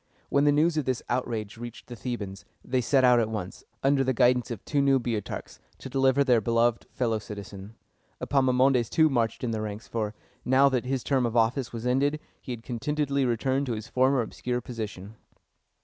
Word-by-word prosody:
When 140 +1 +3
the 145 - +5
news 155 +3 +2
of 150 - 0
this 130 -2 -1
outrage 115 -4 -2
reached 120 0 -8
the 120 - -9
Thebans, 100 -4 -5 0.2
they 130 0 +1
set 135 +1 +3
out 125 -1 +6
at 110 -2 0
once, 105 -4 -5 0.2
under 135 0 +3
the 130 -1 0
guidance 125 +1 +3
of 115 -5 -6
two 145 -2 +1
new 135 -1 +4
Boeotarchs, 115 -4 -4 0.2
to - - -9
deliver 135 +1 +3
their 125 -4 +3
beloved 115 +1 +1
fellow 115 -4 -1
citizen. 100 0 -9 0.4
Epaminondas, 130 -2 +2
too, 160 -2 +3
marched 115 -2 0
in 120 - -1
the 110 -1 -2
ranks; 105 +1 -6
for, 110 -2 -3 0.3
now 135 +2 +5
that 130 -2 -1
his 130 -1 -2
term 130 -4 +1
of 120 +1 -2
office 115 +3 +1
was 115 0 -6
ended, 140 +4 +1 0.2
he - - -7
had 115 -2 -6
contentedly 140 +3 -1
returned 130 +4 0
to 120 - -1
his 110 -1 -6
former 130 0 +3
obscure 125 +2 -3
position. 110 -4 -7
125 Hz, 195 wpm, -27 LUFS, 115-135 Hz, 0.4 s, out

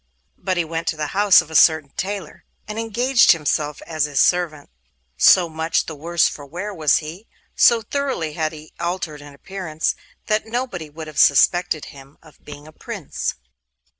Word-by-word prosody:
But 185 0 -2
he 170 - 0
went 165 +1 -5
to 160 - 0
the 155 - -2
house 200 -1 +6
of 160 - -13
a - - -7
certain 160 -4 +4
tailor, 195 -4 -5 0.2
and 210 +1 -5
engaged 240 +2 +4
himself 150 -2 -2
as 155 -2 -1
his 145 -3 -2
servant. 165 -5 +1 0.4
So 175 - +5
much 160 +1 -1
the 160 - -6
worse 165 +3 +1
for 145 - -7
wear 180 +9 -6
was 155 -5 +2
he, 175 +8 -10 0.3
so 235 -2 +5
thoroughly 265 - -3
had 155 0 -2
he 155 -1 -13
altered 170 -4 -4
in 145 -1 -13
appearance, 165 -1 -3 0.3
that 215 0 0
nobody 220 -9 -4
would 160 +2 -9
have 155 -4 -6
suspected 155 +3 +3
him 135 0 -15
of 155 -2 -20
being 145 0 -11
a - - -13
Prince. - - -5
165 Hz, 175 wpm, -21 LUFS, 150-190 Hz, 0.4 s, house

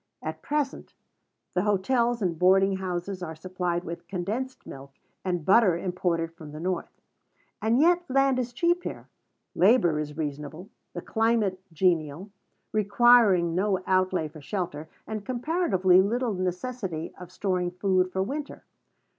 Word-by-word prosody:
At - - -5
present 290 -2 -3 0.6
the 180 - +1
hotels 235 +4 +1
and 170 -3 -1
boarding 195 +1 +4
houses 185 0 -4
are 160 -2 -5
supplied 180 +1 -3
with 170 0 -7
condensed 215 +8 -4
milk, 135 0 -10 0.3
and 175 -4 -2
butter, 195 -4 +5
imported 175 -2 -1
from 155 -3 -11
the 155 - -7
North: 180 +1 -2 0.7
and 225 +3 +2
yet 350 +3 +3
land 270 0 +3
is 245 -1 -2
cheap 345 +8 +1
here; - - -7 0.4
labor 180 -6 +4
is 150 0 -5
reasonable; 150 +4 -5 0.2
the - - -6
climate 220 -4 +1
genial, 165 +1 0 0.4
requiring 210 -4 +4
no 190 +2 +1
outlay 185 -3 +1
for 155 0 -13
shelter, 160 -4 -4 0.2
and 215 -2 -5
comparatively 235 - +2
little 235 +3 0
necessity 185 -1 -3
of 180 -1 -10
storing 185 -2 -1
food 185 0 +1
for 190 0 0
winter. 285 +7 -5
185 Hz, 140 wpm, -27 LUFS, 175-230 Hz, 0.7 s, butter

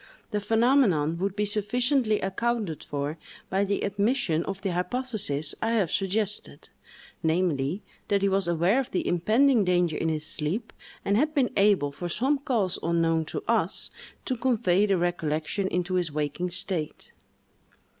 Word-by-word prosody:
The 210 - 0
phenomenon 210 - +2
would 195 +1 -1
be 210 0 0
sufficiently 215 +3 +1
accounted 205 -3 -2
for 145 +2 -4 0.3
by 195 +2 +2
the 200 0 -1
admission 200 -4 0
of 195 -1 -4
the 195 - 0
hypothesis 180 - -2
I 225 +1 +1
have 200 -8 +1
suggested, 205 +2 -1 0.5
namely, 160 0 0 0.2
that 200 -1 +1
he - - +4
was 195 -1 +1
aware 175 +8 +2
of 265 - -3
the 185 - -2
impending 220 +7 +3
danger 175 -3 +2
in 165 - 0
his 155 -1 -2
sleep, 170 +10 -3 0.3
and 200 +1 +2
had 305 +5 +1
been 265 -4 +2
able, 195 -8 +3
from 175 +5 -5
some 270 +10 +1
cause 220 -9 0
unknown 165 -1 +1
to - - -5
us, - - 0 0.3
to 255 - -1
convey 220 -6 +2
the 195 -2 +2
recollection 175 +1 -1
into 180 0 -2
his 175 -4 0
waking 150 +4 -2
state. 175 -3 -2
195 Hz, 155 wpm, -27 LUFS, 170-220 Hz, 0.5 s, he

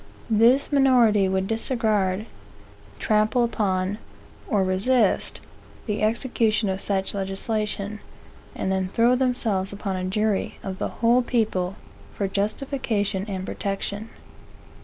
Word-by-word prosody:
This 235 +7 +4
minority 240 -8 +4
would 190 0 0
disregard, 215 -3 0 0.7
trample 215 +3 +2
upon, 200 -3 -1 0.5
or 205 -7 +2
resist, 200 +4 +1 0.5
the 210 -2 -2
execution 220 -2 +1
of 190 0 -2
such 195 -1 0
legislation, 205 +1 -2 0.6
and 190 - -2
then 190 -1 0
throw 235 +5 +3
themselves 230 -7 0
upon 200 -1 -4
a 185 - -3
jury 205 +2 -1
of 190 -1 -5
the - - -1 0.2
whole 240 +2 +5
people 210 -7 0 0.4
for 200 - -1
justification 205 -1 -1
and 190 -2 -4
protection. 200 +2 -4
210 Hz, 115 wpm, -24 LUFS, 195-230 Hz, 0.7 s, whole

